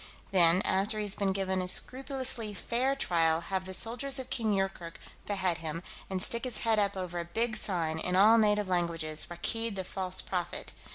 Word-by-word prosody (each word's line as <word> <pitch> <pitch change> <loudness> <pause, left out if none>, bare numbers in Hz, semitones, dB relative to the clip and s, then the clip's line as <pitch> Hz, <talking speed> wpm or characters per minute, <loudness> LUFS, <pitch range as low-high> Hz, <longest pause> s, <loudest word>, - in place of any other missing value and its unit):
Then, 180 0 +5
after 200 +3 0
he's 205 -2 +2
been 200 -2 -1
given 190 -1 -1
a 180 - -4
scrupulously 255 -1 0
fair 250 +7 -1
trial, 165 -9 +1
have 185 +2 -4
the 190 - -7
soldiers 250 +7 0
of 260 - -5
King 225 -3 0
Yoorkerk 190 -3 -3 0.3
behead 190 -4 -1
him, 165 +1 -5 0.3
and 190 -1 -2
stick 235 +4 +2
his 255 -2 0
head 220 -1 +3
up 200 -1 0
over 180 -2 -4
a 170 - -4
big 225 +5 -2
sign, 165 -6 +3
in 180 +2 -1
all 215 +4 +6
native 210 -2 +2
languages, 170 -4 -2
'Rakkeed 225 +6 -3
the 190 - -3
False 185 0 -2
Prophet.' 180 -2 -4
195 Hz, 185 wpm, -30 LUFS, 175-225 Hz, 0.3 s, all